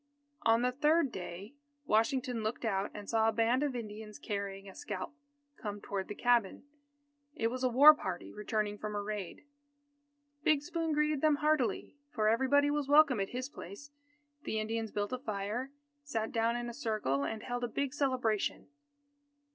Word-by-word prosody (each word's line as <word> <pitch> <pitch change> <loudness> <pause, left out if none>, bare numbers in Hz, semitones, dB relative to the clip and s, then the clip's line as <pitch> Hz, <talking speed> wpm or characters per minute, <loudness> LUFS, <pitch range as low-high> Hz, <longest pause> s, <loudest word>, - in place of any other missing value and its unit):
On 225 +1 +4
the 250 - +2
third 295 +1 +2
day, 185 +4 -7 0.3
Washington 240 +1 +1
looked 220 +2 -3
out 200 -2 0
and 205 -1 -9
saw 225 -1 +3
a - - +2
band 230 +3 +2
of 285 -3 -1
Indians 215 -2 -7
carrying 200 -1 -4
a 190 - -10
scalp, 195 +8 -5 0.4
come 205 -1 -5
toward 195 -1 -4
the 210 - -6
cabin. 240 -4 +2 0.7
It 225 -7 0
was 255 +1 -4
a 255 - +3
war 285 +6 +9
party 185 -12 -5
returning 210 -1 -2
from 210 -1 -4
a 205 - -1
raid. 205 -1 -5 1.0
Big 300 -2 +3
Spoon 330 0 -2
greeted 300 -1 +1
them 310 -1 +4
heartily, 300 -4 0 0.2
for 215 -6 0
everybody 280 +5 +3
was 295 -2 -1
welcome 285 -5 +6
at 195 - -1
his 255 +1 -4
place. 280 +3 -10 0.5
The 220 - -2
Indians 225 +1 -2
built 205 +3 -2
a 255 - -2
fire, 215 +3 -3 0.3
sat 225 -6 -2
down 230 +1 +1
in 240 0 -3
a 235 - -5
circle, 215 - -1
and 220 +8 -4
held 245 0 -3
a - - +1
big 270 +3 -2
celebration. 250 -7 0
230 Hz, 170 wpm, -32 LUFS, 210-270 Hz, 1.0 s, war